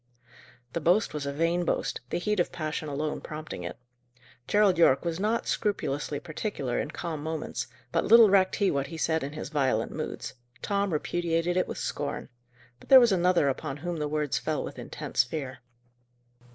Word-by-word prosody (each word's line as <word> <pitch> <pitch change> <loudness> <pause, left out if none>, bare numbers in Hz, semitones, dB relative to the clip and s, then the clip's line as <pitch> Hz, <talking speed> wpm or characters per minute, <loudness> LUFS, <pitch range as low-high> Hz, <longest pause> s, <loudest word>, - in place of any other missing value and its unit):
The 170 - -2
boast 180 +8 +3
was 145 -2 -3
a - - -1
vain 165 +4 +1
boast, 170 - -1
the - - -1
heat 210 +3 0
of 175 - +1
passion 155 -1 -4
alone 150 +2 -2
prompting 155 - -7
it. 85 0 -6 0.7
Gerald 205 -4 +4
Yorke 140 -2 +5
was 170 0 -2
not 220 +3 0
scrupulously 150 -8 -1
particular 155 - -3
in - - -2
calm 160 -2 -5
moments; 160 -4 -4 0.2
but - - +1
little 230 +1 +8
recked 190 -1 +4
he 200 -2 +2
what 140 -1 -1
he 165 - -7
said 160 0 +1
in 140 +2 -5
his 155 - -6
violent 130 -7 0
moods. 155 -3 -5 0.3
Tom 200 -1 0
repudiated 165 +2 0
it 185 - +1
with - - -5
scorn. - - -3 0.5
But - - -18
there 265 - +11
was 240 -3 +5
another 180 -4 +3
upon 140 +1 -2
whom 175 +3 -4
the 150 -1 -1
words 150 -2 -1
fell - - -2
with - - -7
intense - - -1
fear. 130 0 -5
160 Hz, 180 wpm, -28 LUFS, 145-180 Hz, 0.7 s, there